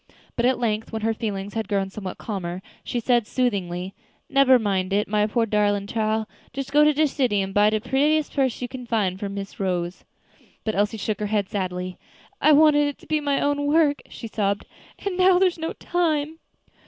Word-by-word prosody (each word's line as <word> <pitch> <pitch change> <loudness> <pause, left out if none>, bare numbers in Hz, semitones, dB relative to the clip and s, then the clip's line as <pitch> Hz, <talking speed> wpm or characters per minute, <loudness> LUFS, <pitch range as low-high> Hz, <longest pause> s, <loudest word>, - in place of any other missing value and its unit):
But 240 +1 +2
at 260 - +2
length, 220 -2 -1
when 220 -1 -4
her 225 0 +2
feelings 205 -3 -4
had 225 -3 -2
grown 195 -2 -1
somewhat 190 -2 -6
calmer, 185 -3 -5 0.2
she 245 - -2
said 240 -2 +2
soothingly, 190 -7 -1 0.4
"Nebber 275 -2 +6
mind 195 -4 -1
it, 205 +1 +1
my 210 0 +2
poor 230 +2 +1
darlin' 205 -2 +1
chile. 220 0 -1 0.3
Just 275 +1 -5
go 295 +1 +6
to 300 - +6
de 305 +1 +2
city 255 -7 +1
and 195 0 -2
buy 205 +1 +5
de 215 0 0
prettiest 290 +6 +1
purse 260 -4 0
you - - -2
can 250 0 -8
find, 200 -5 0
for 200 - -3
Miss 200 0 -7
Rose." 180 -2 -2 0.6
But 220 - -1
Elsie 205 +2 0
shook 215 0 -2
her 210 - -1
head 205 -2 0
sadly. 185 -2 -3 0.4
"I 305 - +6
wanted 295 -1 +6
it 290 - -4
to - - -18
be 310 -1 0
my 285 -1 +1
own 285 0 0
work," 295 -1 +3
she 230 - -8
sobbed, 200 -2 -1 0.4
"and 385 -3 -2
now 370 0 +5
there 375 0 +5
is 345 - -11
no 325 +1 -3
time." 320 -3 -1
220 Hz, 205 wpm, -24 LUFS, 200-285 Hz, 0.6 s, Nebber